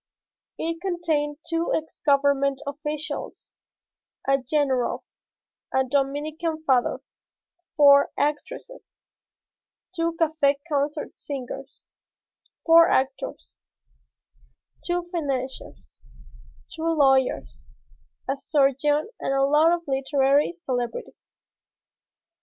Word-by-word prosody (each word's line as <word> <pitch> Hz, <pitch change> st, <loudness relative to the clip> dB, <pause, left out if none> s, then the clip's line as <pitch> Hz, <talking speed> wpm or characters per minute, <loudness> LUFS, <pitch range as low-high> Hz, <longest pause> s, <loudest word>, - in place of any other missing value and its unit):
It 330 Hz, +1 st, -3 dB
contained 320 Hz, -6 st, -1 dB
two 330 Hz, 0 st, -1 dB
ex 315 Hz, 0 st, -5 dB
government 280 Hz, -1 st, +2 dB
officials, 300 Hz, +1 st, -5 dB, 0.7 s
a 275 Hz, 0 st, +3 dB
general, 260 Hz, -1 st, 0 dB, 0.7 s
a 265 Hz, -, +2 dB
Dominican 295 Hz, +4 st, -2 dB
father, 255 Hz, -4 st, +2 dB, 0.8 s
four 280 Hz, -1 st, +7 dB
actresses, 300 Hz, +11 st, -4 dB, 1.0 s
two 330 Hz, 0 st, -1 dB
café 310 Hz, -3 st, +2 dB
concert 295 Hz, 0 st, -2 dB
singers, 270 Hz, 0 st, -8 dB, 0.7 s
four 330 Hz, 0 st, +7 dB
actors, 265 Hz, +1 st, -1 dB, 1.3 s
two 350 Hz, 0 st, -1 dB
financiers, 270 Hz, -6 st, -5 dB, 0.7 s
two 325 Hz, 0 st, -3 dB
lawyers, 270 Hz, -3 st, +2 dB, 0.7 s
a 270 Hz, +1 st, -2 dB
surgeon 290 Hz, +2 st, +2 dB
and 270 Hz, -, -1 dB
a 270 Hz, -, +3 dB
lot 300 Hz, +4 st, +4 dB
of 345 Hz, 0 st, 0 dB
literary 275 Hz, +1 st, +2 dB
celebrities. 250 Hz, -8 st, -4 dB
290 Hz, 85 wpm, -25 LUFS, 275-320 Hz, 1.3 s, four